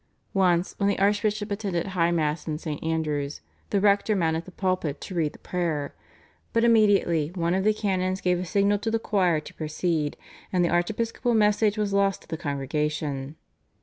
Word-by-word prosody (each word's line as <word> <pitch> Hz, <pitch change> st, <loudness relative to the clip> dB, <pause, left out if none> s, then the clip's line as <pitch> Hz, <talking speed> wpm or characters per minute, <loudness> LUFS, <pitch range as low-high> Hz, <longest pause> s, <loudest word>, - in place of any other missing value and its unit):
Once, 180 Hz, -2 st, +2 dB
when 200 Hz, -, +2 dB
the 200 Hz, -, 0 dB
archbishop 205 Hz, +1 st, +1 dB
attended 195 Hz, -5 st, -1 dB
High 180 Hz, -4 st, +1 dB
Mass 155 Hz, -2 st, -1 dB
in 155 Hz, -1 st, -2 dB
St. 155 Hz, -2 st, -5 dB
Andrew's, 150 Hz, -3 st, -2 dB, 0.3 s
the 200 Hz, -, +2 dB
rector 205 Hz, +1 st, +3 dB
mounted 165 Hz, -2 st, 0 dB
the 185 Hz, -, -11 dB
pulpit 185 Hz, -6 st, -1 dB
to 190 Hz, -, -7 dB
read 160 Hz, -4 st, 0 dB
the -, -, -13 dB
prayer, 165 Hz, -5 st, -2 dB, 0.6 s
but 230 Hz, -, +3 dB
immediately 205 Hz, -9 st, +3 dB
one 170 Hz, -1 st, 0 dB
of 190 Hz, +1 st, +1 dB
the 215 Hz, -, +4 dB
canons 190 Hz, -3 st, -1 dB
gave 180 Hz, -2 st, +1 dB
a 180 Hz, -, -3 dB
signal 200 Hz, +3 st, +2 dB
to 225 Hz, -, -2 dB
the 225 Hz, -, +1 dB
choir 185 Hz, -7 st, +1 dB
to 150 Hz, -, -11 dB
proceed, 155 Hz, -1 st, -2 dB, 0.3 s
and 180 Hz, -3 st, +2 dB
the -, -, +1 dB
archiepiscopal 225 Hz, +7 st, 0 dB
message 210 Hz, 0 st, +3 dB
was 205 Hz, -2 st, -1 dB
lost 200 Hz, -1 st, +1 dB
to -, -, -21 dB
the -, -, -3 dB
congregation. 145 Hz, -1 st, -2 dB
180 Hz, 180 wpm, -26 LUFS, 160-205 Hz, 0.6 s, the